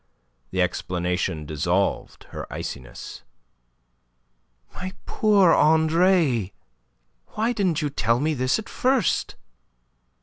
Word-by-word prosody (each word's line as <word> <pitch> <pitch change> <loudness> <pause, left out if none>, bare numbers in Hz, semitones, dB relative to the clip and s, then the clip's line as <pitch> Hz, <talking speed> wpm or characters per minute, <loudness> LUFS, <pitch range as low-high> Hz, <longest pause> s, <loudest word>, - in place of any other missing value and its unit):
The 95 -1 +1
explanation 90 -3 -2
dissolved 85 +6 -1
her - - -7
iciness. 65 -3 -7 1.5
"My 185 +1 -6
poor 205 -5 +4
Andre, 160 - +3 0.8
why 225 +3 0
didn't 180 -8 0
you 145 - -1
tell 115 -3 +1
me 155 +3 0
this 130 -2 +1
at 220 - -7
first?" 260 -1 0
150 Hz, 95 wpm, -24 LUFS, -, 1.5 s, poor